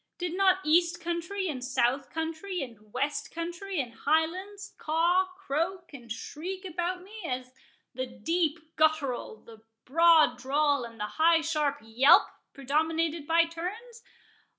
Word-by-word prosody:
Did 355 -1 -3
not 380 -1 +3
east 340 +2 +3
country, 345 +3 -3
and 265 -6 -4
south 255 +1 0
country, 325 +3 -3
and 215 -4 -12
west 290 +6 -2
country, 345 +2 -4
and 245 -4 -3
Highlands, 345 - -1
caw, 345 +4 +2
croak, 350 +1 -3
and 240 -5 -11
shriek 360 - -6
about 360 +1 -3
me, 425 +3 -11
as 255 -4 -4 0.4
the 255 +1 -3
deep 320 +4 -2
guttural, 295 -8 0
the 225 -1 -14 0.2
broad 320 -3 +5
drawl, 285 0 +1
and 230 -1 -12
the 210 - -1 0.2
high 330 0 +6
sharp 305 -3 0
yelp 235 +5 +6 0.3
predominated 315 +3 -1
by 330 +1 +4
turns? 415 +9 -7
320 Hz, 135 wpm, -29 LUFS, 275-350 Hz, 0.4 s, high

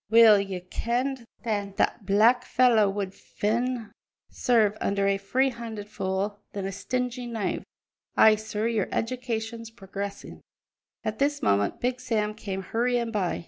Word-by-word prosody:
Weel 220 -2 +8
ye 195 -2 -3
kenned 240 +6 -2 0.2
that 205 -3 -2
that 205 - 0
black 225 +5 +5
fellow 235 -5 +4
would 195 -1 -3
fain 235 +3 -2 0.4
serve 220 -4 +3
under 200 0 +1
a 195 0 +2
free 260 +7 +1
handed 225 -3 -7
fool 195 +1 -2
than 200 -2 -3
a 195 - -2
stingy 250 +4 -3
knave. 225 -5 -2 0.5
Ay, 220 - +8
sir, 215 0 -3
your 225 -4 0
education's 230 -1 -3
progressin'!" 200 -1 -7 0.6
At 215 0 -3
this 285 +1 +1
moment 100 0 +2
Big 250 +1 -1
Sam 215 -3 -1
came 195 -3 -5
hurrying 235 +2 0
by. 195 -5 -1
220 Hz, 140 wpm, -27 LUFS, 200-240 Hz, 0.6 s, Weel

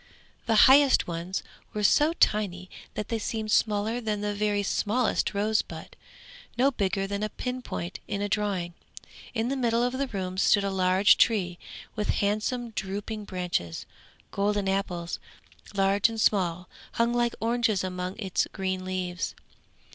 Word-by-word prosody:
The 225 - +3
highest 275 0 +6
ones 175 +2 -4 0.3
were 210 - -1
so 295 +9 +4
tiny 190 - +1 0.2
that 210 - -4
they 230 - -1
seemed 220 0 -3
smaller 215 +3 +1
than 210 -2 -2
the 210 0 -1
very 205 0 0
smallest 215 +2 0
rosebud, 210 +2 -1 0.6
no 265 +3 +4
bigger 195 -4 -1
than 200 +1 -3
a 215 - -1
pinpoint 250 -9 -5
in 200 - -2
a 205 - -1
drawing. 200 -4 -1 0.6
In 225 +1 0
the 275 - 0
middle 235 -2 +1
of 245 +1 0
the 275 - 0
room 185 -4 -4
stood 200 +1 +4
a 200 - -1
large 185 +1 +4
tree, 185 -7 +2 0.4
with 210 -1 -2
handsome 215 +4 0
drooping 205 +1 -4
branches; 175 - -3 0.5
golden 205 0 0
apples, 180 -3 -2 0.6
large 195 +2 +3
and 225 -1 -5
small, 180 -5 +1 0.3
hung 235 +1 +1
like 240 -1 +1
oranges 230 -3 +1
among 180 0 -4
its 195 -5 0
green 190 -1 -2
leaves. 185 -1 -3
205 Hz, 145 wpm, -27 LUFS, 185-225 Hz, 0.6 s, highest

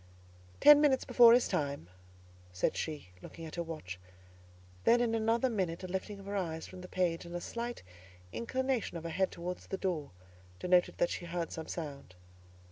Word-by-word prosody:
"Ten 295 0 +9
minutes 275 -3 +3
behind 235 -1 +8
his 245 - +3
time," 140 - -2 0.6
said 90 - 0
she, 150 - -4
looking 165 - -9
at 155 - -9
her 170 - -2
watch; 155 - -6 0.8
then, 240 - +5
in 235 -2 +1
another 225 +3 +2
minute, 185 -7 -2
a - - -4
lifting 190 +2 -4
of 195 - -11
her 200 +1 -4
eyes 160 -4 -2
from 185 -1 -10
the 180 - -8
page, 180 -3 0
and 170 0 -8
a - - -1
slight 235 +6 -5 0.5
inclination 260 -4 -1
of 165 - -8
her 165 - -4
head 190 +3 +1
towards 180 +1 -6
the 195 - -3
door, 170 -7 -2 0.5
denoted 180 - +2
that 175 - +2
she 175 - -4
heard 170 0 -3
some 160 - -6
sound. 140 - -6
180 Hz, 185 wpm, -32 LUFS, 165-225 Hz, 0.8 s, Ten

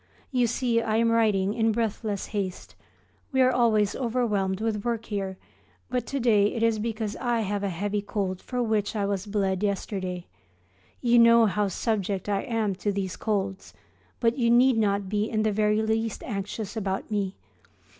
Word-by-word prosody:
You 250 -3 +2
see 235 0 +1
I 220 -1 -1
am 230 0 +3
writing 210 -4 +2
in 225 0 +2
breathless 215 -2 -2
haste. 195 -3 -4 0.6
We 265 - 0
are 255 - +4
always 220 -5 +2
overwhelmed 215 -6 0
with 215 -2 -1
work 230 -2 -2
here; 195 -3 -3 0.5
but 250 -1 -1
to 275 - -2
day 210 -4 +3
it 230 - -1
is 225 -1 +2
because 220 -1 -3
I 240 -2 0
have 205 -1 -2
a 200 - -1
heavy 205 +4 -2
cold 195 -2 -3
for 250 -1 -2
which 220 -2 0
I 205 -2 0
was 200 0 -2
bled 195 -2 0
yesterday. 185 -3 -2 0.8
You 240 -1 +4
know 230 0 +7
how 210 0 +1
subject 195 -1 -2
I 200 -1 +1
am 225 -4 -1
to 205 - -1
these 195 -2 -3
colds, 195 -3 -3 0.4
but 235 +2 +1
you 235 -1 +3
need 245 +2 +5
not 200 -2 +1
be 210 +2 -1
in 215 -2 0
the 215 - +2
very 210 +1 +2
least 220 0 -1
anxious 205 0 -4
about 195 0 -3
me. 200 -2 -1
210 Hz, 175 wpm, -26 LUFS, 200-230 Hz, 0.8 s, know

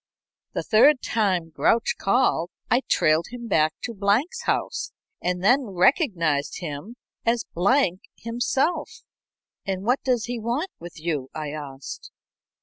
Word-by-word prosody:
The - - -2
third 255 +5 +5
time 185 -7 0
Grouch 160 +11 +2
called 195 -5 +2 0.2
I 245 +3 +4
trailed 155 +2 +3
him 240 -1 -7
to 155 +7 +1
Blank's 225 - +1
house, - - -1 0.3
and 180 0 -1
then 255 +6 +4
recognized 180 - +1
him 170 +7 -6 0.3
as 230 0 +1
Blank 190 0 +2 0.2
himself." 245 +8 -1 0.6
"And 190 -2 -3
what 250 +5 +2
does 250 -4 +1
he 245 -1 -4
want 245 - -2
with 170 -1 -10
you?" 150 -5 -2
I 150 -2 -4
asked. 140 -3 -8
200 Hz, 130 wpm, -24 LUFS, 165-245 Hz, 0.6 s, third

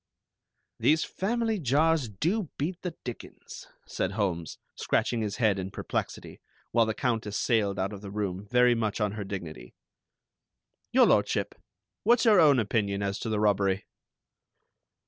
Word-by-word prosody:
"These 155 +1 +3
family 225 +1 -1
jars 150 -1 +2
do 170 - -1
beat 170 +5 -3
the 175 -3 -5
dickens," 120 -2 -9 0.2
said 95 - -3
Holmes, 90 -6 -2 0.2
scratching 120 -2 0
his 105 -2 -2
head 110 -5 +2
in 95 0 -4
perplexity, - - -5 0.3
while 115 -1 +3
the 110 - -2
Countess 110 -5 -1
sailed 105 -5 +1
out 95 +2 -2
of 100 - -8
the 100 - -8
room, 100 -1 -4
very 125 0 +5
much 110 -3 -1
on 105 -2 0
her 105 0 -5
dignity. 85 -10 -7 1.2
"Your - - +6
Lordship, - - +1 0.5
what's 240 +3 +3
your 210 -4 +6
own 150 -5 +6
opinion 100 -3 0
as 100 0 -2
to 115 - -4
the 110 -1 0
robbery?" 100 -2 +1
110 Hz, 145 wpm, -28 LUFS, 100-145 Hz, 1.2 s, Your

